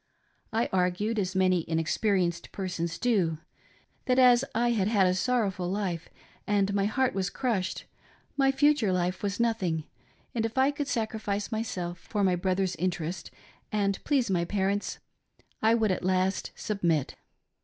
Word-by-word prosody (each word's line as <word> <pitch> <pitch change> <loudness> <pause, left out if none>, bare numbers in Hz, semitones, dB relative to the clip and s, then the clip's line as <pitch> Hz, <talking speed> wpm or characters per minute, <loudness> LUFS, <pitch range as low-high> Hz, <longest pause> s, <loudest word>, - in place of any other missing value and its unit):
I 225 +1 +1
argued 190 +5 +1
as 190 -1 -2
many 185 -1 +3
inexperienced 175 +2 0
persons 170 -3 -3
do, 190 -10 +1 0.7
that 250 0 +3
as 250 -1 +6
I 240 +1 +2
had 205 -5 +1
had 205 -3 +3
a 180 - +3
sorrowful 190 -3 0
life 185 -4 -2 0.4
and 200 -1 +2
my 200 -1 +2
heart 255 +4 +1
was 190 -1 -1
crushed, 200 -4 -2 0.5
my 270 -1 +3
future 270 -6 +3
life 180 0 -1
was 200 +1 -2
nothing, 190 -9 0 0.5
and 230 - -1
if 225 +2 -3
I 265 +2 +4
could 290 -1 -4
sacrifice 220 -4 -2
myself 185 -6 -3
for 205 +4 -2
my 185 -2 +3
brother's 185 0 0
interest 175 -1 -3 0.4
and 200 -2 0
please 275 -5 +2
my 175 -2 +2
parents, 200 +2 -1 0.6
I 225 +1 +4
would 220 -3 +2
at 180 - -2
last 185 +1 +1
submit. 170 - -1
200 Hz, 150 wpm, -28 LUFS, 180-225 Hz, 0.7 s, as